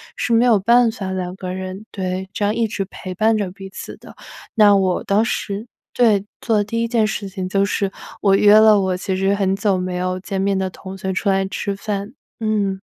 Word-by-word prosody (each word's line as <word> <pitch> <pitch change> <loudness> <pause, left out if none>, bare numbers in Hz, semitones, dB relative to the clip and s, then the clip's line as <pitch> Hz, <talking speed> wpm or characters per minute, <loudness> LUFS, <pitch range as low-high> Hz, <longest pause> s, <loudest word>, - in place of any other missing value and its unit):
是 - - -2
没 230 +1 +4
有 230 -4 +5
办 235 +3 +4
法 200 -4 -5
两 185 -1 -4
个 185 -1 -6
人 190 +2 -6
对， 185 0 -4
这 205 - -1
样 205 - +1
一 230 0 0
直 205 -2 -3
陪 185 -1 -8
伴 220 +4 +3
着 205 -3 -1
彼 195 +1 -10
此 - - -8
的， - - -14 0.4
那 210 -3 +6
我 190 -2 +1
当 205 +3 +2
时， 205 -1 -3 0.3
对， 215 -5 +4 0.2
做 225 - +1
的 205 - +2
第 230 +3 -2
1 - - 0
件 230 -2 +2
事 210 -1 -4
情 185 -1 -5
就 195 +1 +2
是 200 -1 -1 0.3
我 195 -1 +4
约 205 +1 +6
了 215 -1 +6
我 190 -1 0
其 190 +1 -2
实 195 +1 +2
很 195 -1 +1
久 200 0 +1
没 180 0 -3
有 185 0 -2
见 190 +1 -4
面 195 +1 +1
的 190 0 -1
同 190 +1 -9
学 190 0 -3
出 190 +2 -1
来 195 0 +2
吃 200 +1 -3
饭， 205 +2 -4 0.3
嗯。 205 -3 0
195 Hz, 240 characters per minute, -20 LUFS, 190-215 Hz, 0.4 s, 那